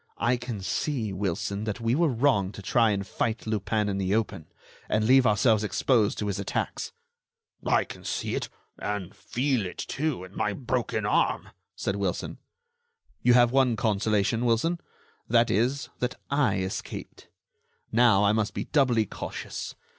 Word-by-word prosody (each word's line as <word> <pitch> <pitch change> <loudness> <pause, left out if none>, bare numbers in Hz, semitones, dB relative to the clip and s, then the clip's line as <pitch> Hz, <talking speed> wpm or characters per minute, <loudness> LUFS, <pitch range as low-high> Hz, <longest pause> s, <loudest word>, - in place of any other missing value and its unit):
I 120 +2 +2
can 120 -4 -5
see, 110 +3 -1
Wilson, 100 +2 -2
that 105 +1 -3
we 115 0 +1
were 165 +5 +3
wrong 120 -7 +2
to 100 - -9
try 115 +3 +3
and 100 -1 -1
fight 110 +3 -2
Lupin 110 0 0
in 100 -1 -1
the 95 +1 +1
open, 105 -8 -2 0.4
and 110 0 +2
leave 130 +2 +6
ourselves 110 +1 +3
exposed 110 0 +2
to 105 - -2
his 100 -2 -2
attacks." 100 - -3 0.7
"I - - +3
can - - -11
see - - -2
it, - - -2 0.3
and 105 -2 -3
feel 120 +5 0
it, 90 - -6
too, 145 - -2
in 95 +1 -12
my 105 - 0
broken 125 -1 -2
arm," - - +1 0.3
said 95 - -2
Wilson. 100 -3 -2 0.8
"You 125 -1 +5
have 120 -1 +5
one 130 -3 +3
consolation, 110 0 +1
Wilson; 125 +9 +1 0.5
that 115 0 +4
is, 125 +7 +1
that 125 0 -1 0.2
I 140 -8 +3
escaped. 95 +1 -6 0.6
Now, 115 -3 +5
I 100 - +4
must 110 -1 0
be - - -2
doubly 125 -7 +3
cautious. - - -6
110 Hz, 160 wpm, -27 LUFS, 100-125 Hz, 0.8 s, leave